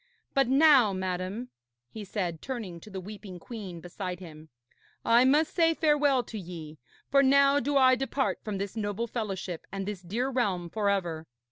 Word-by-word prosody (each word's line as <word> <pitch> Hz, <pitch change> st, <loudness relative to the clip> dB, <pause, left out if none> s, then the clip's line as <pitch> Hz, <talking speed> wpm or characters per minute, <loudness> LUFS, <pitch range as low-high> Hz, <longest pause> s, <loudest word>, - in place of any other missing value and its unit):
But 275 Hz, -2 st, +3 dB
now, 270 Hz, -5 st, +6 dB
madam,' 185 Hz, +5 st, -3 dB, 0.4 s
he 220 Hz, -, -7 dB
said, 180 Hz, -5 st, -3 dB
turning 220 Hz, -10 st, -5 dB
to 215 Hz, -, -13 dB
the 195 Hz, -2 st, -6 dB
weeping 200 Hz, -1 st, -9 dB
queen 185 Hz, -3 st, -8 dB
beside 180 Hz, +1 st, -6 dB
him, 160 Hz, -3 st, -12 dB, 0.6 s
'I 235 Hz, +2 st, +5 dB
must 300 Hz, +4 st, +3 dB
say 330 Hz, -2 st, +3 dB
farewell 295 Hz, -5 st, +3 dB
to 220 Hz, -, -7 dB
ye, 165 Hz, -4 st, -9 dB, 0.3 s
for 275 Hz, -, +6 dB
now 275 Hz, +1 st, +5 dB
do 285 Hz, +2 st, 0 dB
I 260 Hz, -1 st, +6 dB
depart 270 Hz, +1 st, -1 dB
from 210 Hz, -2 st, -3 dB
this 200 Hz, +2 st, -4 dB
noble 210 Hz, +1 st, -2 dB
fellowship 195 Hz, -7 st, -5 dB
and 195 Hz, 0 st, -4 dB
this 205 Hz, -3 st, -4 dB
dear 225 Hz, +9 st, -2 dB
realm 195 Hz, -10 st, -1 dB
for 210 Hz, -2 st, 0 dB
ever. 170 Hz, -5 st, -2 dB
210 Hz, 170 wpm, -28 LUFS, 185-260 Hz, 0.6 s, now